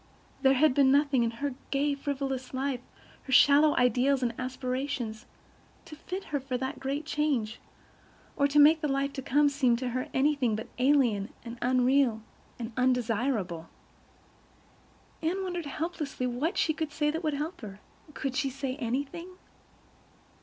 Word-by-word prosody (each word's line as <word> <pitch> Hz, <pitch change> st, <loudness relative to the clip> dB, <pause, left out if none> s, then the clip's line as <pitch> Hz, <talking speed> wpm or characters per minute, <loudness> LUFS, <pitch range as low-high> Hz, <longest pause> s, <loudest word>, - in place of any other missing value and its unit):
There 270 Hz, 0 st, +5 dB
had 295 Hz, +1 st, +4 dB
been 270 Hz, -1 st, +4 dB
nothing 280 Hz, -2 st, +3 dB
in 230 Hz, -, +1 dB
her 265 Hz, +4 st, -4 dB, 0.2 s
gay, 285 Hz, +1 st, +1 dB
frivolous 270 Hz, -2 st, -4 dB
life, 265 Hz, -1 st, -1 dB, 0.5 s
her 265 Hz, -, -7 dB
shallow 290 Hz, +3 st, +6 dB
ideals 250 Hz, +2 st, +3 dB
and 235 Hz, -1 st, 0 dB
aspirations, 255 Hz, -2 st, -3 dB, 0.6 s
to 325 Hz, -3 st, -10 dB
fit 370 Hz, +5 st, -6 dB
her 285 Hz, -, +2 dB
for 260 Hz, -1 st, -3 dB
that 260 Hz, +1 st, -4 dB
great 280 Hz, +3 st, -3 dB
change, 285 Hz, -9 st, -1 dB, 0.8 s
or 280 Hz, -, +3 dB
make 305 Hz, +2 st, +7 dB
the 300 Hz, -, 0 dB
life 275 Hz, 0 st, -1 dB
to 270 Hz, -, -5 dB
come 290 Hz, +3 st, +3 dB
seem 275 Hz, -4 st, +2 dB
to 250 Hz, +1 st, -3 dB
her 255 Hz, +1 st, -3 dB
anything 265 Hz, -4 st, +2 dB
but 220 Hz, -, -6 dB
alien 250 Hz, -7 st, +2 dB
and 235 Hz, 0 st, -8 dB
unreal 250 Hz, -2 st, +2 dB, 0.3 s
and 235 Hz, -1 st, -5 dB
undesirable. 230 Hz, -8 st, 0 dB, 1.5 s
Anne 360 Hz, +4 st, -1 dB
wondered 350 Hz, -4 st, -4 dB
helplessly 305 Hz, -3 st, -3 dB
what 280 Hz, -, -1 dB
she 315 Hz, -, +2 dB
could 315 Hz, -1 st, -4 dB
say 295 Hz, 0 st, 0 dB
that 325 Hz, +3 st, -4 dB
would 305 Hz, -2 st, 0 dB
help 305 Hz, +4 st, -4 dB
her. 205 Hz, -3 st, -9 dB, 0.4 s
Could 270 Hz, -1 st, -3 dB
she 275 Hz, +1 st, 0 dB
say 270 Hz, 0 st, -4 dB
anything? 280 Hz, +7 st, -3 dB
270 Hz, 155 wpm, -29 LUFS, 250-295 Hz, 1.5 s, make